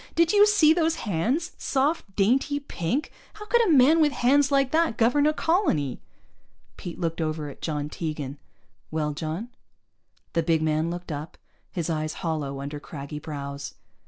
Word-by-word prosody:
Did 335 +2 +3
you 415 0 +7
see 350 -7 +5
those 325 -1 +1
hands? 235 - 0
Soft, 270 - 0
dainty, 265 +8 +2
pink! 270 - -3 0.2
How 420 - -9
could 475 +2 +3
a - - +3
man 300 +3 +6
with 300 -1 +4
hands 280 +3 +3
like 275 -2 +3
that 320 -8 +2
govern 285 +6 +3
a - - +4
colony?" 305 - 0 0.7
Pete 175 - -7
looked 165 -1 -2
over 155 -2 -2
at 140 - -12
John 150 -2 -2
Tegan. 150 -3 -5 0.5
"Well, 150 -1 -1
John?" 160 +9 -4 0.8
The 165 - +2
big 160 -1 +1
man 155 +1 +1
looked 175 0 -6
up, 150 +2 -6 0.3
his 170 -4 -3
eyes 155 -2 -2
hollow 145 -4 -2
under 145 +1 -5
craggy 145 0 -7
brows. 140 -2 -6
175 Hz, 160 wpm, -26 LUFS, -, 0.8 s, you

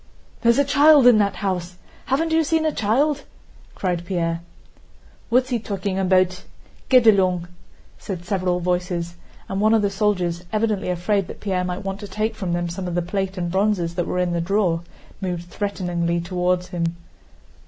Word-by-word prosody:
"There's 235 0 +4
a 280 - +4
child 290 0 +6
in 245 -3 +7
that 200 -1 +1
house. 180 -3 -3 0.3
Haven't 320 +5 +1
you 320 0 +3
seen 320 +1 +1
a 310 - +2
child?" 280 +7 +1 0.5
cried 180 -3 -2
Pierre. 170 -2 -2 0.9
"What's 255 +2 +3
he 245 -3 0
talking 195 -2 -3
about? 185 -1 +2 0.5
Get 255 -3 +6
along!" 185 -5 +4 0.5
said 180 -3 -6
several 185 -2 0
voices, 175 -1 -1 0.3
and 195 +1 -2
one 215 +1 +4
of 215 - +2
the 200 - +1
soldiers, 185 -4 0
evidently 215 -3 0
afraid 180 +2 0
that - - -9
Pierre 185 -3 -1
might 180 +2 -4
want 195 0 -3
to 205 - -7
take 215 +2 -2
from 190 -5 -3
them 175 0 -1
some 180 +2 -5
of 175 - -3
the 175 - 0
plate 195 +1 -3
and 175 -1 -2
bronzes 190 -3 +1
that 175 0 -2
were - - -2
in 180 -1 0
the 170 - 0
drawer, 180 -2 +1 0.4
moved 175 -2 -4
threateningly 175 -4 -1
toward 180 +1 0
him. 170 -2 -2
190 Hz, 175 wpm, -22 LUFS, 175-215 Hz, 0.9 s, in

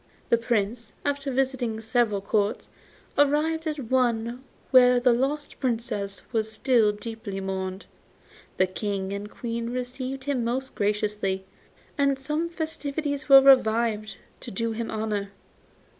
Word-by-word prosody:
The 235 - +5
Prince, 230 -1 -1
after 285 -1 -1
visiting 255 -4 0
several 225 -2 +1
Courts, 205 +1 -1 0.5
arrived 310 +3 +2
at 305 - -1
the 280 - -6
one 240 0 0 0.3
where 250 -1 +7
the 245 0 +4
lost 280 +5 -2
Princess 225 -6 -2
was 220 -1 0
still 230 -3 +3
deeply 210 -2 -6
mourned. 190 0 -4 0.7
The 185 - +4
King 195 0 -3
and 200 +1 -5
Queen 235 +1 -4
received 255 +2 -4
him 270 -3 -1
most 260 +3 -2
graciously, 205 -2 -1 0.5
and 275 -1 +3
some 300 +5 -2
festivities 305 -3 -3
were 270 -1 +10
revived 225 -5 +4 0.2
to - - -7
do 230 +4 -2
him 225 +1 -4
honour. 210 -2 -2
235 Hz, 130 wpm, -26 LUFS, 210-270 Hz, 0.7 s, were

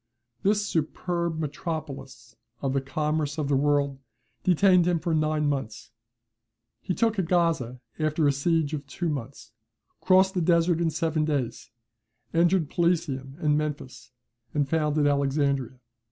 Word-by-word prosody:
This 210 +1 +2
superb 170 0 -2
metropolis 140 -5 -6 0.2
of 135 -1 -1
the 135 - +1
commerce 150 +2 -2
of 150 -2 -2
the 140 - +3
world 140 -1 +1 0.4
detained 180 0 +4
him 175 -2 +2
nine 155 -2 +1
months. 135 -7 -3 0.9
He 180 - -2
took 225 -4 +1
Gaza 165 -8 0 0.2
after 155 0 +1
a - - +5
siege 155 +2 0
of 145 -2 -4
two 170 +4 -3
months; 135 -2 -6 0.5
crossed 190 0 +4
the 180 - 0
Desert 170 0 +3
in 165 - +2
seven 160 0 0
days; 145 -6 -2 0.6
entered 170 0 +3
Pelusium 155 -6 -1
and 150 -3 +1
Memphis, 150 -4 -4 0.4
and 145 -2 +1
founded 150 -1 +1
Alexandria. 140 -3 0
155 Hz, 130 wpm, -26 LUFS, 140-170 Hz, 0.9 s, a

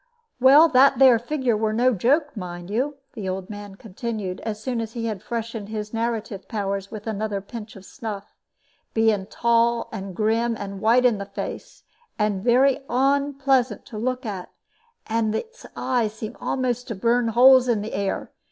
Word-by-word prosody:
"Well, 280 +6 +8
that 270 0 +5
there 260 -4 +7
figure 255 -1 0
were 215 0 0
no 250 +3 +3
joke, 285 - +1
mind 175 -2 -7
you," 265 +7 -1 0.2
the 210 -7 -4
old 185 +1 -4
man 205 -1 -8
continued, 210 -2 -5
as 215 -2 -4
soon 235 +1 -2
as 225 0 -6
he 230 -1 -3
had 215 -5 -3
freshened 230 -3 -5
his 215 0 -5
narrative 225 -3 -3
powers 200 -3 -3
with 215 -2 -8
another 215 -2 -2
pinch 220 +2 -9
of 195 -1 -12
snuff, 215 -5 -7 0.6
"being 220 -4 +2
tall 235 +1 +1
and 195 -4 -6
grim, 225 +2 +1
and 200 -1 -6
white 235 +3 +4
in 230 -5 +3
the 200 - -5
face, - - -7 0.3
and 210 -3 0
very 255 +3 +4
onpleasant 270 -2 +1
for - - -37
to 215 - -6
look 255 +2 -2
at, 195 -4 -5 0.6
and 220 -1 0
its 465 - -6
eyes 235 -5 0
seemed 220 0 -7
a'most 250 -1 -1
to 230 - -4
burn 235 +4 +2
holes 255 +3 +6
in 220 -4 +1
the 220 - -6
air. 200 0 -2
225 Hz, 175 wpm, -24 LUFS, 210-250 Hz, 0.6 s, Well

